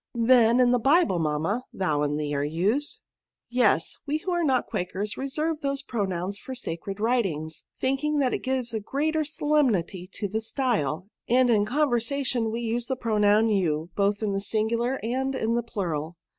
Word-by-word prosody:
Then^ 235 0 +5
in 245 -1 +5
the 245 - +3
Bible^ 270 - +3
mamma, 160 +11 -1
thou 155 -6 0
and 145 0 0
thee 150 -1 -2
are 140 0 0
used*" 195 - 0 0.5
Yes; 230 -9 +2
we 295 +2 +1
who 360 +4 -4
are 345 -1 +1
not 260 -5 +1
Quakers^ 200 0 -3
reserve 300 +4 -2
those 275 -1 -2
pronouns 195 -5 -2
for 260 - -7
sacred 195 -3 -4
writings, 190 -10 -1
thinking 285 +3 0
that 265 -3 +2
it - - 0
gives 255 -3 -1
a 220 - -1
greater 305 +8 -1
solemnity 265 - 0
to 205 - -3
the 220 +3 -2
style; 220 - -1 0.2
and 250 +1 +4
in 205 -2 +3
conversation 250 -2 0
we 230 +2 -3
use 235 +1 -1
the 260 - -1
pronoun 215 -2 +3
you, 170 -5 0
both 205 +1 +1
in 205 -2 0
the 195 - -1
singular 230 +5 0
and 265 +4 -1
in 225 -2 0
the 240 - +1
plural. 170 -8 -4
230 Hz, 175 wpm, -26 LUFS, 195-260 Hz, 0.5 s, Then^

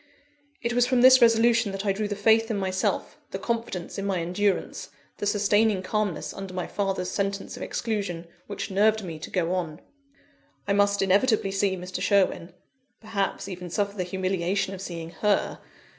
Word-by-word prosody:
It 235 0 0
was 245 0 +3
from 255 -1 +2
this 255 +1 +8
resolution 230 -1 +4
that 195 +1 -4
I 200 - +3
drew 210 +2 -2
the 205 - -3
faith 225 +2 +3
in 220 - -1
myself, 190 -1 -1
the - - -4
confidence 230 -6 -3
in 195 - -3
my 195 -2 0
endurance, 185 +4 -1 0.3
the 205 - -2
sustaining 205 -1 +2
calmness 210 -2 -2
under 195 -2 -7
my 180 - -2
father's 195 -2 -2
sentence 195 0 -2
of - - -10
exclusion, 200 -7 -3 0.2
which 205 0 -5
nerved 215 +2 +3
me 165 -4 -6
to 155 - -7
go 180 -1 0
on. 165 -4 -3 0.9
I 200 - +2
must 200 0 +3
inevitably 200 +1 +2
see 195 -1 0
Mr. 180 +1 -6
Sherwin 185 -3 +2 0.5
(perhaps 210 -3 -2
even 180 -2 -7
suffer 200 +3 -1
the 185 - -1
humiliation 190 +1 -1
of 190 - -7
seeing 165 -3 -6
her!) 205 +4 0
200 Hz, 175 wpm, -26 LUFS, 185-215 Hz, 0.9 s, this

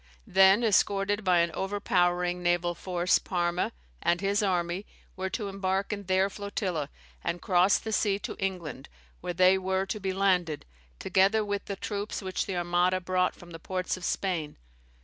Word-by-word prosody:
Then, 195 +4 +5
escorted 205 -1 +2
by 180 -3 +4
an 170 0 0
overpowering 180 -2 0
naval 175 0 +1
force, 180 0 +1
Parma 175 -1 -1 0.3
and 175 - +2
his 200 +2 +1
army 180 -1 0 0.3
were 190 0 -3
to 205 +2 -3
embark 195 +1 -1
in 200 -1 -6
their 190 +1 +3
flotilla, 195 -7 -3 0.3
and 175 - -2
cross 180 +2 +4
the 220 - -5
sea 205 -2 +2
to - - -6
England 180 -8 -4 0.3
where 175 - -4
they 185 +2 +5
were 190 0 0
to 195 +2 -4
be 190 -1 -2
landed, 180 -5 +1 0.3
together 200 - +2
with 205 -1 -3
the 200 - -4
troops 205 +1 -4
which 185 -1 -2
the 190 -2 -2
Armada 175 +1 +2
brought 180 0 0
from 175 0 -14
the 165 - -8
ports 185 +2 -2
of 185 - -11
Spain. 175 -6 -2
185 Hz, 170 wpm, -28 LUFS, 175-195 Hz, 0.3 s, Then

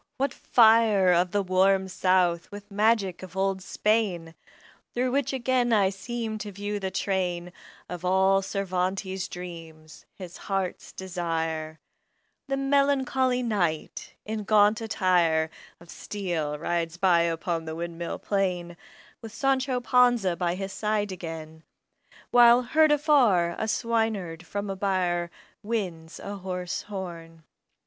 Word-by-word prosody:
what 270 0 0
fire 220 -5 +4
Of 175 +1 +2
the 200 +2 0
"warm 190 +1 +2
South" 185 -2 +1
with 205 0 -10
magic 205 -3 +1
of 185 0 -10
old 195 0 0
Spain! 190 -5 0 0.6
Through 250 +1 0
which 275 0 0
again 255 -2 +1
I 200 -4 +3
seem 220 +2 -5
to 205 0 -6
view 205 +1 -4
the 190 -1 -3
train 180 -2 -2 0.3
Of 180 -1 -7
all 190 +1 +3
Cervantes' 190 -1 -2
dreams, 165 -3 -10
his 180 -2 -9
heart's 195 -2 -3
desire: 165 -4 -3 0.7
The 275 0 -1
melancholy 270 -2 +1
Knight, 175 -9 -2
in 215 0 -4
gaunt 210 +1 +4
attire 175 -7 +1 0.3
Of 170 0 -14
steel 170 -7 -3
rides 170 +1 -2
by 175 -2 +4
upon 165 0 -1
the 160 0 -5
windmill 170 0 -5
plain 180 -4 -2 0.4
With 225 - -9
Sancho 265 +1 0
Panza 245 -7 +3
by 175 0 -1
his 195 +1 -5
side 210 -1 -1
again, 160 -3 -7 0.7
While, 240 0 +7
heard 310 +5 +3
afar, 250 - +3
a 220 - -1
swineherd 215 -7 -1
from 205 0 -4
a - - -4
byre 180 -3 0 0.3
Winds 185 -7 -4
a 200 0 -6
hoarse 180 -2 -4
horn. 170 -5 -8
190 Hz, 130 wpm, -26 LUFS, 175-220 Hz, 0.7 s, While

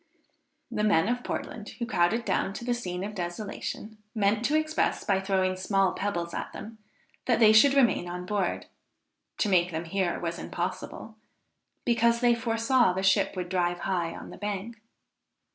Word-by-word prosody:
The 210 -2 -1
men 205 -4 +3
of 245 +1 -1
Portland 215 -2 -5
who 235 - -2
crowded 225 +2 +1
down 195 - 0
to 235 - -7
the 245 - +1
scene 185 -6 -4
of 210 +2 -5
desolation, 205 +3 -5 0.2
meant 210 +1 +2
to 300 - +2
express, 310 0 0
by 195 -1 +2
throwing 190 -1 +1
small 195 0 +1
pebbles 170 -4 -3
at - - -4
them, 220 0 -9 0.5
that 245 - +4
they 220 -2 +6
should 275 +6 +6
remain 235 -9 +3
on 180 +1 -5
board, 200 -2 -1 0.7
to - - +1
make 180 -3 +3
them 165 0 -4
hear 185 0 -1
was 170 0 -3
impossible, 185 +5 -5 0.7
because 235 -1 +3
they 240 -1 +4
foresaw 230 -2 +2
the 190 +1 -2
ship 190 +1 +3
would 180 -1 -4
drive 175 -1 0
high 175 -3 -1
on - - -9
the - - -10
bank. 210 +2 -4
200 Hz, 170 wpm, -28 LUFS, 180-230 Hz, 0.7 s, they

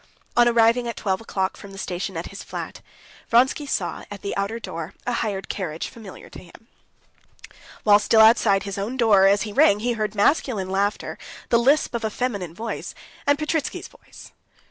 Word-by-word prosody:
On 240 0 +5
arriving 235 +1 +3
at 235 - -4
twelve 190 0 -1
o'clock 190 -4 -2
from 200 -1 -12
the - - -10
station 185 -1 -4
at 165 - -5
his 200 - -8
flat, - - -7 0.5
Vronsky 260 +5 +3
saw, 175 -10 -2
at 205 -2 -9
the 200 - -3
outer 200 +3 -2
door, 165 -6 -7
a 245 - -1
hired 205 -4 -2
carriage 165 -5 -4
familiar 215 -5 -12
to - - -11
him. 185 +5 -17 1.2
While 205 -1 +6
still 220 +1 +4
outside 220 -3 +5
his 200 0 -5
own 225 +6 -3
door, 205 -6 +5
as 200 0 +3
he 210 -2 -6
rang, 205 0 +4
he 240 +1 0
heard 215 -2 -3
masculine 205 - +1
laughter, 200 +2 -1 0.3
the 235 - +4
lisp 275 +5 +2
of 235 -1 -3
a 220 - 0
feminine 205 -8 -3
voice, 225 +3 -5 0.3
and 285 0 +4
Petritsky's 305 0 -2
voice. - - -16
210 Hz, 185 wpm, -23 LUFS, 195-235 Hz, 1.2 s, While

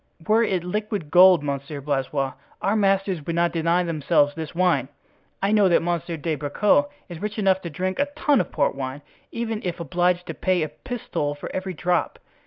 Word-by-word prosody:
"Were 220 +2 +4
it 190 -6 0
liquid 205 -3 -3
gold, 180 -2 +7
Monsieur 140 +1 -4
Blaisois, 135 -1 -1 0.3
our 200 - 0
masters 195 -5 +1
would 165 +3 -3
not 170 0 +2
deny 170 +2 +1
themselves 150 -3 +2
this 160 +1 -7
wine. 170 -8 +2 0.6
Know 205 -2 +4
that 170 - +3
Monsieur 170 -1 -2
de 160 +2 -2
Bracieux 155 - +2 0.2
is 170 -3 -9
rich 210 +1 -4
enough 190 -2 +2
to 170 - -5
drink 185 +5 -3
a 285 - +2
tun 290 -3 +3
of - - -6
port - - +1
wine, 135 +1 -5 0.3
even 225 -2 -3
if 175 -2 -3
obliged 175 +2 0
to - - -5
pay 185 -3 0
a 155 - -3
pistole 170 - -4
for 145 - -7
every 185 -1 -3
drop." 175 +2 0
175 Hz, 190 wpm, -24 LUFS, 150-195 Hz, 0.6 s, gold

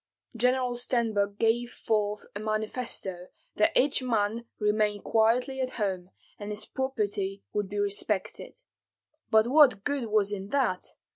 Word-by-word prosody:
General 250 +1 +2
Stenbok 225 -5 0
gave 235 +2 +1
forth 210 -2 -1
a - - -3
manifesto 215 -4 -3 0.3
that 210 - +4
each 275 +1 +3
man 230 -2 0
remain 210 -1 +1
quietly 245 +4 +2
at 255 0 -3
home, 190 -4 -2 0.3
and 205 0 -6
his 210 0 -3
property 205 -7 -2
would 205 -2 -1
be 205 - -5
respected. 205 - -2 0.7
But 220 -1 +5
what 260 -5 +5
good 285 -5 -1
was 210 -2 +2
in 195 -1 -4
that! 245 -7 -1
215 Hz, 135 wpm, -28 LUFS, 205-245 Hz, 0.7 s, But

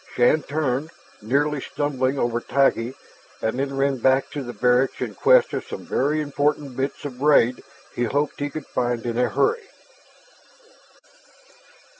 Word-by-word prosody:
Shann 125 +6 +4
turned, 145 -1 -2 0.3
nearly 140 +6 0
stumbling 135 -2 -1
over 120 -2 0
Taggi, 130 -2 +1 0.4
and 110 +3 -2
then 135 0 -2
ran 135 0 +1
back 130 +2 +2
to 145 - -4
the 120 -2 -6
barracks 125 +3 +2
in - - -3
quest - - +4
of - - -2
some - - -7
very 150 +3 0
important 145 -2 -1
bits 135 +3 -3
of 130 -3 -6
braid 130 -4 +3 0.3
he 120 - -1
hoped 145 +5 -1
he 145 0 -2
could 155 0 -7
find 120 -2 -2
in 120 -1 -2
a 125 - +2
hurry. 450 -1 0
135 Hz, 150 wpm, -23 LUFS, 125-145 Hz, 0.4 s, Shann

